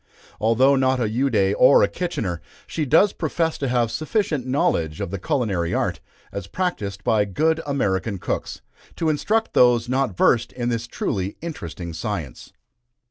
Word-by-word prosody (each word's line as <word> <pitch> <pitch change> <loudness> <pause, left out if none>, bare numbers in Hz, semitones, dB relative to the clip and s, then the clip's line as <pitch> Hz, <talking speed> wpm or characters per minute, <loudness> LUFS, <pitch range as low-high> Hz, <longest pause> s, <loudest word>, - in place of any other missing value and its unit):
Although 120 +5 +4
not 130 -1 +2
a 115 - +1
Ude 110 -4 +1
or 130 +2 +7
a - - +4
Kitchener, 110 - -3 0.2
she 155 - -3
does 165 +9 +4
profess 165 0 -1
to 140 - -1
have 120 -2 +1
sufficient 155 - -1
knowledge 130 - 0
of 100 -3 -4
the 100 - -4
culinary 100 - -1
art, - - -1 0.3
as 100 -2 -6
practised 105 - -3
by 110 -4 +3
good 160 - 0
American 100 -7 -1
cooks, - - -4 0.3
to 160 - 0
instruct 220 +9 0
those 120 -1 +4
not 130 -6 0
versed 120 0 +3
in 120 -1 -2
this 120 0 -2
truly 95 -4 -3
interesting 85 - -6
science. 80 - -5
120 Hz, 155 wpm, -23 LUFS, 100-150 Hz, 0.3 s, or